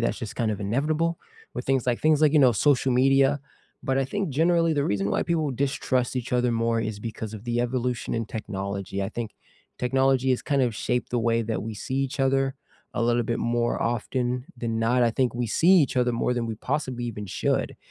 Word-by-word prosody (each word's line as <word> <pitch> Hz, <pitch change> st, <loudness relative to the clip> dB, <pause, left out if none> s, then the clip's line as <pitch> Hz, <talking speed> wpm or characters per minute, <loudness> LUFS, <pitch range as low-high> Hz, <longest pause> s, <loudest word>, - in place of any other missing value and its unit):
that's 115 Hz, -, 0 dB
just 110 Hz, -, -6 dB
kind 115 Hz, -3 st, 0 dB
of 105 Hz, -, -3 dB
inevitable 150 Hz, +10 st, 0 dB, 0.4 s
with -, -, -4 dB
things 135 Hz, -2 st, +1 dB
like 120 Hz, -1 st, +1 dB
things 155 Hz, -1 st, +3 dB
like, 155 Hz, -1 st, +5 dB
you 155 Hz, -, +5 dB
know, 130 Hz, -3 st, +6 dB
social 130 Hz, +3 st, +2 dB
media. 135 Hz, +2 st, +4 dB, 0.4 s
But 135 Hz, 0 st, 0 dB
I 135 Hz, -, +2 dB
think, 195 Hz, +3 st, -2 dB
generally, 165 Hz, +3 st, +3 dB
the 145 Hz, -2 st, +1 dB
reason 100 Hz, -4 st, 0 dB
why -, -, +1 dB
people 160 Hz, -5 st, 0 dB
distrust 130 Hz, -1 st, -1 dB
each 125 Hz, 0 st, -4 dB
other 125 Hz, 0 st, +2 dB
more 115 Hz, 0 st, +1 dB
is 110 Hz, -2 st, -3 dB
because 110 Hz, 0 st, -6 dB
of 110 Hz, 0 st, -8 dB
the 120 Hz, 0 st, 0 dB
evolution 125 Hz, 0 st, -2 dB
in 115 Hz, 0 st, -1 dB
technology, 100 Hz, -3 st, -4 dB
I 95 Hz, -, -2 dB
think 115 Hz, -2 st, -5 dB, 0.5 s
technology 130 Hz, +1 st, +2 dB
has 125 Hz, -, +1 dB
kind 140 Hz, -2 st, +1 dB
of 120 Hz, -4 st, 0 dB
shaped 125 Hz, +3 st, -2 dB
the 120 Hz, -, 0 dB
way 115 Hz, 0 st, +1 dB
that 110 Hz, 0 st, -2 dB
we 110 Hz, +1 st, -5 dB
see 115 Hz, +6 st, -5 dB
each 135 Hz, +1 st, -1 dB
other 135 Hz, 0 st, +1 dB, 0.4 s
a -, -, -1 dB
little 120 Hz, +1 st, +2 dB
bit 115 Hz, 0 st, -2 dB
more 120 Hz, 0 st, 0 dB
often 125 Hz, +2 st, -1 dB
than 115 Hz, -2 st, -2 dB
not, 120 Hz, +2 st, +2 dB
I 115 Hz, -, +4 dB
think 125 Hz, +1 st, 0 dB
we 120 Hz, 0 st, -1 dB
see 160 Hz, +9 st, +1 dB
each 175 Hz, -9 st, +5 dB
other 125 Hz, -1 st, +3 dB
more 120 Hz, +1 st, 0 dB
than 120 Hz, -1 st, -1 dB
we 115 Hz, -, -3 dB
possibly 125 Hz, 0 st, -3 dB
even 105 Hz, -3 st, -5 dB
should. -, -, -1 dB
125 Hz, 220 wpm, -25 LUFS, 115-135 Hz, 0.5 s, know